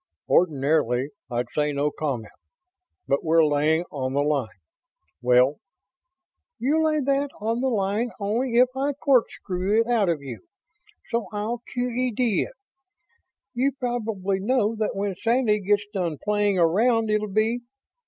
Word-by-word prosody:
"Ordinarily 140 -5 +2 0.2
I'd 120 0 -3
say 150 0 0
'no 145 +1 0
comment', 135 -9 -4 0.8
but 140 - +1
we're 165 0 +4
laying 150 +3 +2
on 130 -2 -3
the 140 +1 +2
line... 145 -5 0 0.7
well 125 +3 +4 0.5
..." 360 +7 -61
"You'll 310 +6 +1
lay 305 -1 +1
that 280 +1 +1
on 225 +3 -1
the 265 +1 +1
line 210 +1 0
only 230 +5 -1
if 250 +1 +6
I 280 +2 0
corkscrew 220 -7 +1
it - - -1
out 225 -6 +2
you, 125 -8 -9 0.6
so 235 -1 -1
I'll 220 +3 -3
Q.E.D. 245 -3 0
it. - - -16 1.0
You 260 +3 +1
probably 225 -7 -2
know 225 +1 +1
that 215 -2 -2
when 200 0 -1
Sandy 225 +2 +1
gets 205 +1 +1
done 175 -6 -2
playing 205 -2 +2
around 220 +6 +3
it'll 215 0 +1
be 215 +4 0
210 Hz, 140 wpm, -24 LUFS, 155-245 Hz, 1.0 s, if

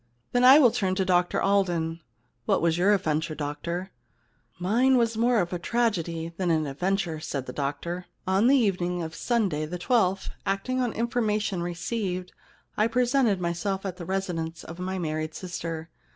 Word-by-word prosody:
Then 245 0 +2
I 260 +3 +10
will 255 -7 +6
turn 190 -3 0
to 190 0 0
Dr 180 -1 +2
Alden. 175 -5 +1 0.5
What - - +3
was 165 -1 +2
your 180 +4 +3
adventure, 155 -4 -1
doctor? 170 +6 -4 0.7
Mine 240 +9 +3
was 230 -2 +2
more 235 +1 +3
a 175 -1 -1
tragedy 170 -7 -1
than 185 -2 0
an 160 -2 +2
adven 180 +8 0
ture,' 170 -5 -3
said 140 -4 -4
the 125 - -7
doctor. 160 +6 -3
* - - -37
On 205 +5 +4
the 275 +2 +6
evening 180 -6 0
of 160 0 -6
Sunday 190 -9 0
the 180 +3 -4
twelfth, 190 -1 +1
acting 205 +7 -1
on 245 -2 0
information 215 -5 -1
received, 180 +1 -3 0.4
I 215 - +3
presented 245 -3 +2
myself 180 +3 -2
at 185 -2 -4
the 175 - -7
residence 170 -3 -3
of 165 +2 -9
my 185 +1 -3
married 155 -2 -3
sister. 165 -3 -5
180 Hz, 170 wpm, -26 LUFS, 165-215 Hz, 0.7 s, I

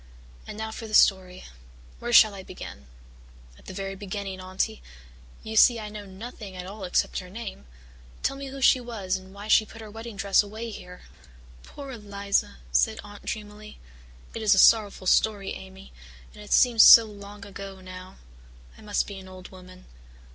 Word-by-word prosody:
"And - - -8
now 220 0 -4
for 225 0 -7
the 215 - -2
story. 185 -2 +3 0.6
Where 240 - -4
shall 220 -3 +7
I 195 - -8
begin?" 70 - -10 0.7
"At - - -21
the - - -7
very 195 0 -4
beginning, 195 -1 -6
Aunty. 185 +4 -3 0.6
You 220 0 -6
see 235 +1 +6
I 210 -1 -6
know 210 -1 -8
nothing 200 0 -9
at 180 0 -7
all 195 +1 -7
except 180 - 0
her 180 - -10
name. 200 - -8 0.6
Tell 275 - 0
me 275 0 -7
who 270 0 -8
she 260 - +5
was 220 -6 -3
and 190 0 -9
why 200 +2 -10
she 215 - +5
put 220 +1 -13
her 215 -2 -10
wedding 225 0 -8
dress 200 0 +3
away 220 +3 -7
here." 180 -3 -11 0.6
"Poor 275 - -10
Eliza!" 200 - -2 0.2
said - - +2
Aunt 205 0 -13
dreamily. 210 0 -7 0.6
"It 225 - -5
is 210 -2 +4
a - - -3
sorrowful 205 -2 +4
story, 200 +1 +2
Amy, 190 +1 -11 0.4
and 210 - -13
it 210 - -12
seems 240 -3 +5
so 230 0 +10
long 205 -1 -11
ago 195 -1 -9
now. 185 0 -11 0.6
I - - -14
must 210 -1 -1
be 200 -2 -8
an 190 - -12
old 185 -1 -11
woman. 185 0 -14
200 Hz, 185 wpm, -26 LUFS, 190-220 Hz, 0.7 s, so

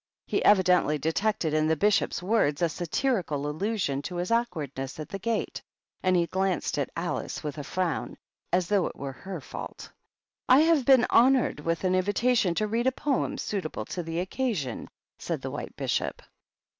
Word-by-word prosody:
He - - 0
evidently 180 -6 +4
detected 160 +2 0
in 155 0 +2
the 160 - +3
Bishop's 200 +1 +1
words 180 -7 +2
a 170 - +3
satirical 170 - -1
allusion 155 -3 -1
to 180 +5 -6
his 175 +3 -2
awkwardness 155 - -2
at 155 - -6
the 195 - -5
gate, 230 +3 -2 0.4
and 185 0 +2
he 170 -1 +3
glanced 190 -3 -1
at 140 - -1
Alice 165 0 -3
with 150 0 -4
a - - -4
frown, 180 +2 -2 0.3
as 180 -1 +2
though 200 -2 +2
it - - -8
were 135 0 -5
her 190 +8 -7
fault. - - -8 0.6
"I 260 +3 +8
have 320 -5 +3
been 260 -2 +6
honored 255 - +4
with 165 +4 -2
an 185 -1 +2
invitation 205 +1 +2
to 215 - +1
read 230 +4 0
a - - +4
poem 275 0 -1
suitable 165 - -3
to 180 - -2
the 165 0 -3
Occasion," 190 - -2 0.3
said - - -4
the - - -4
White - - -6
Bishop. - - -2
185 Hz, 175 wpm, -27 LUFS, 155-220 Hz, 0.6 s, I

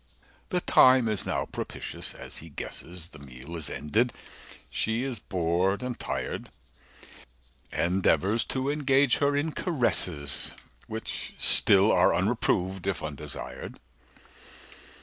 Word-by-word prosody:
The 180 -4 0
time 130 -6 +6
is 105 -3 -1
now - - -1
propitious, - - -5
as - - -6
he 80 - -8
guesses, 85 +3 -5
235 - - -27
The 75 - -13 0.3
meal 85 - -5
is 80 -3 -3
ended, 115 +11 0 0.5
she 110 +3 -1
is 130 -5 -3
bored 90 +4 0
and 125 -2 -4
tired, - - -4 1.2
Endeavours 95 +5 +2
to 135 +1 -1
engage 140 -3 +3
her 145 0 +2
in 150 +3 0
caresses 90 - 0 0.3
Which 110 +1 -4
still 100 +1 +6
are 90 - +4
unreproved, 95 -2 0
if 95 - -1
undesired. 75 -1 -6
100 Hz, 120 wpm, -28 LUFS, 85-130 Hz, 1.2 s, time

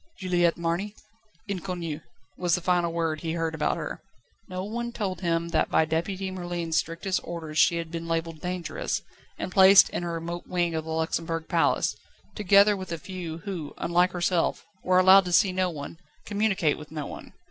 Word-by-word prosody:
"Juliette 175 -2 +1
Marny? 170 +5 -2 0.5
Inconnue," 175 -5 -4 0.4
was 175 -2 +1
the 180 - -3
final 175 -1 +1
word 165 -2 -1
he 165 -1 -2
heard 165 -1 -1
about 160 - 0
her. - - -5 0.5
No 185 0 -4
one 235 +4 -4
told 195 -6 -3
him 170 -1 0
that 160 -2 +1
by 160 - +3
Deputy 185 +4 -2
Merlin's 175 -3 -3
strictest 175 +3 -1
orders 160 -3 -4
she 170 - +5
had 165 -1 -5
been 165 0 -5
labelled 165 -1 -2
"dangerous," 180 -1 -3 0.3
and 185 - -4
placed 190 +1 +8
in - - -3
a 175 - -3
remote 170 +1 -5
wing 175 -2 0
of 160 -1 -3
the - - -8
Luxembourg 160 0 -2
Palace, 165 -1 +2 0.4
together 205 0 +5
with 185 -2 -7
a 170 - -2
few, 170 -1 -6
who, 175 -7 -5
like 175 +1 +2
herself, 175 -1 0 0.2
were 185 0 +3
allowed 190 +1 +7
to 180 - -3
see 190 +2 +4
no 185 0 0
one, 160 0 -8 0.3
communicate 200 -7 +1
with 150 -1 -11
no 155 -2 -4
one. - - -9
175 Hz, 180 wpm, -26 LUFS, 165-185 Hz, 0.5 s, placed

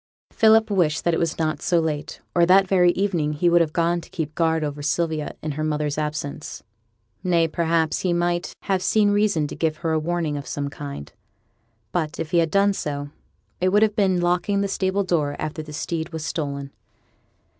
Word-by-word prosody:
Philip 220 0 +4
wished 170 -6 +1
that 170 - +2
it - - +1
was 165 -2 -1
not 155 -3 -1
so 175 - +2
late, 155 -2 -3
or 175 - +4
that 190 +1 +6
very 180 -2 +4
evening 175 -7 0
he 170 +4 +2
would 175 0 +5
have 160 -2 +1
gone 170 +1 +1
to - - -15
keep 155 -2 -4
guard 160 -1 +1
over 145 -1 -4
Sylvia 155 0 -1
in 155 - -2
her 155 +2 -3
mother's 150 -1 -1
absence 150 -1 -4 0.6
nay, 170 -2 +3
perhaps 160 0 0
he 185 - 0
might 175 0 -1
have 190 -2 0
seen 205 +2 +3
reason 205 -7 +2
to 145 - -6
give 160 -1 -1
her 165 - +2
a 160 - +2
warning 165 -2 -1
of 140 - -7
some 140 -1 -3
kind. 140 - -8 0.8
But, 155 0 -2
if 155 - -4
he 175 - +4
had 165 -1 +2
done 200 +3 +3
so, 145 -5 -4 0.5
it 185 - +2
would 205 +3 +4
have 215 -1 +1
been 190 -4 +2
locking 180 +3 +1
the 200 - 0
stable 190 +1 0
door 155 -6 0
after 155 +1 -4
the 155 0 -10
steed 160 +2 -3
was 160 -2 -5
stolen. 140 -4 -4
165 Hz, 200 wpm, -23 LUFS, 150-180 Hz, 0.8 s, that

